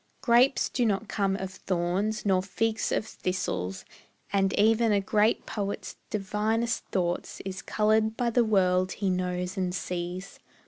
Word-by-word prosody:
Grapes 250 Hz, +1 st, +4 dB
do 250 Hz, -, -1 dB
not 215 Hz, -1 st, 0 dB
come 195 Hz, -2 st, 0 dB
of 190 Hz, -1 st, -4 dB
thorns 190 Hz, +4 st, -1 dB
nor 190 Hz, -2 st, +3 dB
figs 220 Hz, +3 st, -1 dB
of -, -, 0 dB
thistles, 95 Hz, -, -3 dB, 0.5 s
And 195 Hz, -1 st, +3 dB
even 225 Hz, +2 st, +4 dB
a 205 Hz, -, +4 dB
great 210 Hz, +2 st, +2 dB
poet's 200 Hz, -2 st, -4 dB
divinest 215 Hz, +3 st, -1 dB
thought 175 Hz, -2 st, -2 dB
Is 190 Hz, 0 st, -5 dB
coloured 220 Hz, +1 st, +1 dB
by 240 Hz, -1 st, +1 dB
the 240 Hz, +1 st, +4 dB
world 185 Hz, -4 st, +2 dB
he 195 Hz, -2 st, -1 dB
knows 180 Hz, +1 st, -2 dB
and 180 Hz, -1 st, -1 dB
sees. 180 Hz, +1 st, -5 dB
195 Hz, 145 wpm, -28 LUFS, 185-220 Hz, 0.5 s, Grapes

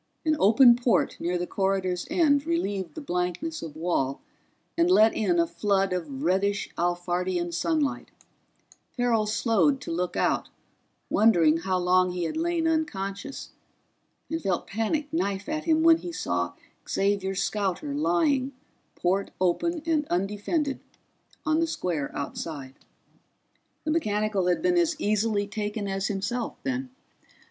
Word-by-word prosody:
An 310 Hz, -1 st, +3 dB
open 235 Hz, +5 st, +7 dB
port 240 Hz, -5 st, +1 dB
near 175 Hz, +1 st, -1 dB
the 175 Hz, -, -2 dB
corridor's 190 Hz, -2 st, -1 dB
end 290 Hz, -3 st, +3 dB
relieved 205 Hz, -, -2 dB
the 315 Hz, -, -6 dB
blankness 180 Hz, -, -2 dB
of 160 Hz, -3 st, -7 dB
wall 155 Hz, -5 st, -1 dB, 0.6 s
and 340 Hz, +1 st, +3 dB
let 220 Hz, -11 st, +6 dB
in 345 Hz, +11 st, +1 dB
a 335 Hz, -, +4 dB
flood 195 Hz, -, 0 dB
of 150 Hz, -6 st, -4 dB
reddish 195 Hz, +4 st, +1 dB
Alphardian 175 Hz, 0 st, -1 dB
sunlight; 290 Hz, -, -1 dB, 0.9 s
Farrell 235 Hz, -3 st, +2 dB
slowed 230 Hz, +5 st, +2 dB
to -, -, -6 dB
look 180 Hz, +2 st, -2 dB
out, -, -, +1 dB, 0.6 s
wondering 170 Hz, -8 st, +5 dB
how 185 Hz, +2 st, -1 dB
long 180 Hz, 0 st, +3 dB
he 180 Hz, -1 st, -2 dB
had 165 Hz, -, -3 dB
lain 330 Hz, 0 st, 0 dB
unconscious, 275 Hz, -6 st, -3 dB, 0.8 s
and 325 Hz, +1 st, -3 dB
felt 185 Hz, -, -1 dB
panic 285 Hz, +8 st, -2 dB
knife 200 Hz, -, -1 dB
at 310 Hz, 0 st, -3 dB
him 320 Hz, -1 st, +3 dB
when 330 Hz, 0 st, +7 dB
he 345 Hz, +1 st, -7 dB
saw 90 Hz, -, -2 dB, 0.4 s
Xavier's 195 Hz, -1 st, 0 dB
scouter 190 Hz, -8 st, -2 dB
lying, 255 Hz, -, +1 dB, 0.4 s
port 190 Hz, +3 st, 0 dB
open 315 Hz, -, 0 dB
and 310 Hz, -3 st, +1 dB
undefended, 210 Hz, -, -1 dB, 0.7 s
on 310 Hz, +1 st, +2 dB
the 330 Hz, -, +2 dB
square 170 Hz, -, -2 dB
outside. 140 Hz, -2 st, -5 dB, 1.1 s
The 310 Hz, -, -1 dB
mechanical 210 Hz, -, 0 dB
had 180 Hz, -, +1 dB
been 355 Hz, -1 st, +3 dB
as 340 Hz, -1 st, +2 dB
easily 210 Hz, -2 st, +1 dB
taken 205 Hz, 0 st, -4 dB
as 195 Hz, 0 st, -1 dB
himself, 225 Hz, +4 st, -2 dB
then. 260 Hz, 0 st, -2 dB
205 Hz, 135 wpm, -26 LUFS, 180-290 Hz, 1.1 s, open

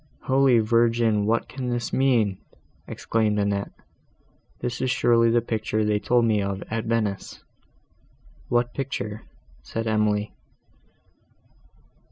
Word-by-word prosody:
"Holy 130 Hz, -2 st, +4 dB
Virgin! 115 Hz, -1 st, +2 dB
what 115 Hz, +1 st, +1 dB
can 130 Hz, -2 st, -5 dB
this 120 Hz, -1 st, -3 dB
mean?" 120 Hz, -8 st, +2 dB, 0.5 s
exclaimed 110 Hz, -2 st, -1 dB
Annette. 100 Hz, -1 st, -1 dB, 0.9 s
"This 120 Hz, 0 st, -4 dB
is 130 Hz, -, 0 dB
surely 115 Hz, -1 st, +3 dB
the 120 Hz, +1 st, +3 dB
picture 110 Hz, -1 st, -1 dB
they 105 Hz, 0 st, +1 dB
told 120 Hz, +2 st, +2 dB
me 110 Hz, -2 st, +2 dB
of 100 Hz, 0 st, -3 dB
at 115 Hz, 0 st, -2 dB
Venice." 110 Hz, -4 st, -2 dB, 1.1 s
"What 120 Hz, 0 st, +1 dB
picture?" 110 Hz, -6 st, -4 dB, 0.4 s
said 115 Hz, 0 st, -5 dB
Emily. 105 Hz, -1 st, 0 dB
115 Hz, 115 wpm, -24 LUFS, 105-120 Hz, 1.1 s, Holy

